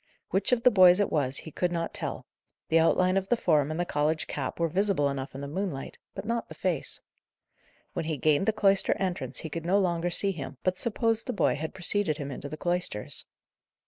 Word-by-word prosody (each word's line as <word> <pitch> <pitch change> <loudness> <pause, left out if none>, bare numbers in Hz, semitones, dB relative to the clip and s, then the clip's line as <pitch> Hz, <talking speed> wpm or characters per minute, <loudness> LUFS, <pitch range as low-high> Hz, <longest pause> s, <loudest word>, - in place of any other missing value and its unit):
Which 195 - +1
of 240 -2 +2
the 250 - +7
boys 185 -2 +7
it 205 - +1
was 135 -3 +1
he 160 - -6
could 175 +4 -1
not 165 -1 -2
tell; - - -4 0.4
the 165 - +5
outline 185 +3 +3
of 195 0 -1
the 240 - +3
form 150 -8 +2
and 155 +2 -3
the 175 - +1
college 155 0 0
cap 140 +2 -4
were 170 - +2
visible 180 -4 +1
enough 135 -1 -5
in 135 - -6
the 140 - -5
moonlight; 160 -3 -4 0.2
but 195 - -6
not 230 +1 -2
the - - -9
face. 175 -6 -2 0.9
When - - -3
he 155 -2 -2
gained 155 +7 +2
the - - +5
cloister 195 -2 +3
entrance 185 -2 -2
he 160 - -6
could 165 0 -4
no 180 +4 +2
longer 175 -3 +1
see 195 +3 +2
him, 145 -6 -7
but 185 0 +1
supposed 225 +1 0
the - - -1
boy - - +2
had 160 +4 -5
preceded 185 -3 +1
him 140 -2 -5
into 140 +2 -6
the 155 - -6
cloisters. 175 -12 -1
175 Hz, 220 wpm, -28 LUFS, 150-195 Hz, 0.9 s, the